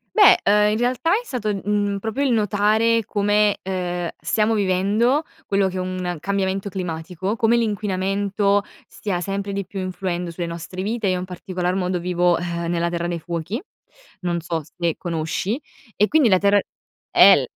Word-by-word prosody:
Beh, - - +7
uhm, 210 +1 +4
in 215 - 0
realtà 255 +6 +1
è 445 - +2
stato, 220 - -2
mhmm, 205 -1 0
proprio 225 +7 -2
il 265 - +2
notare 215 +1 +2
come, 205 0 +2
ehm, 180 -2 -3
stiamo 215 +7 +1
vivendo, 210 - +2 0.2
quello 195 -1 +2
che 185 - -4
è - - -1
un 185 -2 -3
cambiamento 195 +2 -1
climatico, 180 +2 -3
come 230 0 +3
l'inquinamento, 200 -1 0 0.2
stia 185 -4 -3
sempre 195 +2 -3
di 200 -1 -3
più 195 +1 -7
influendo 180 -2 -3
sulle 170 0 -4
nostre 170 +2 -6
vite, 215 +1 -1
io 185 -1 +1
in 180 - -4
particolar 180 0 -3
modo 180 -1 -1
vivo, 175 0 +2
eh, 170 -1 -3
nella 170 0 0
Terra 170 0 -2
dei 170 -1 -3
Fuochi. 170 - -4 0.6
Non 175 -1 -1
so 165 -1 -2
se 165 +2 -2
conosci 175 - -2 0.4
e 210 - +3
quindi 295 -7 +4
la 185 - +5
terra 200 +1 +4 0.5
eh - - +8
l - - 0
195 Hz, 170 wpm, -22 LUFS, 175-210 Hz, 0.6 s, eh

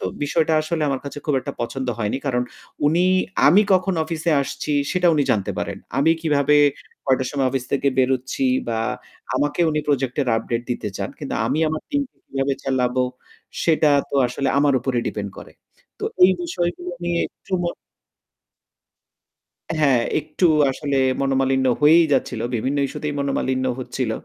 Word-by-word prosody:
তো - - -5 0.2
বিষয়টা 160 +2 +1
আসলে 155 0 -2
আমার 135 -1 -1
কাছে 140 +1 -6
খুব 150 - +1
একটা - - -6
পছন্দ 130 +3 -3
হয়নি। 105 +3 -1
কারণ 125 -2 +1 0.4
উনি 165 +4 +3 0.4
আমি 185 +8 +7
কখন 190 0 +2
অফিসে 165 +1 -2
আসছি 150 - -4 0.2
সেটা 180 -1 +2
উনি 145 - +2
জানতে 100 -3 0
পারেন। - - -3 0.2
আমি 155 +4 +4
কিভাবে 150 -2 +2 0.5
কয়টার 130 -1 +2
সময় 135 -2 0
অফিস 130 -1 -2
থেকে 140 0 +2
বেরোচ্ছি 130 +1 +1 0.2
বা 115 -1 -1 0.6
আমাকে 145 +5 0
উনি 150 0 0
প্রজেক্ট 135 -3 0
এর 130 - -3
আপডেট 115 +1 -2
দিতে 115 -3 -2
চান। - - -3
কিন্তু - - -4
আমি - - 0
আমার 155 0 -3
টিম 285 -1 +1
কে - - -46
কিভাবে 135 0 -1
চালাবো 130 -1 +1 0.6
সেটা 160 -2 +3 0.2
তো - - -5
আসলে 130 +2 -2
আমার 140 -1 +3
উপর 130 +1 -2
ডিপেন্ড 100 -1 -3
করে। - - -11 0.5
তো - - -4 0.2
এই 185 - +6
বিষয়গুলো 175 0 -3
নিয়ে 175 0 0
একটু - - -17
মন 175 - -2 2.1
হ্যাঁ, 135 -5 +4 0.2
একটু 155 +4 -3 0.3
আসলে 140 +1 -2 0.2
মনোমালিন্য 135 -1 +1 0.2
হয়েই 160 +3 +7
যাচ্ছিল। 125 -3 0
বিভিন্ন 130 +5 -1
ইস্যুতেই 150 +1 -4
মনোমালিন্য 130 -2 -1
হচ্ছিল। 125 -1 -3
140 Hz, 160 wpm, -22 LUFS, 130-155 Hz, 2.1 s, আমি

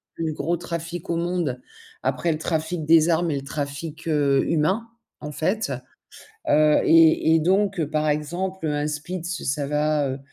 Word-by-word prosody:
plus 160 -2 -2
gros 170 +4 -1
trafics 170 0 -6
au 170 - 0
monde, 170 -7 -2 0.4
après 130 +6 0
le 155 - -2
trafic 160 0 -2
des 165 +1 +5
armes 170 +1 +2
et 145 - -1
le 135 - -4
trafic, 150 +3 -5
heu, 140 -3 +2
humain, 190 +9 +1 0.3
en 150 - -7
fait. 185 +3 -1 0.8
Heu 150 0 +5
et 160 0 +5
et 165 - +4
donc 190 +2 +1
heu, 150 - -2
par 155 0 0
exemple, 165 +4 -2
un 145 0 -1
spitz 170 +4 -4
ça 140 +1 -1
va, 150 -1 +1
heu, 135 - -4
160 Hz, 170 wpm, -23 LUFS, 150-170 Hz, 0.8 s, des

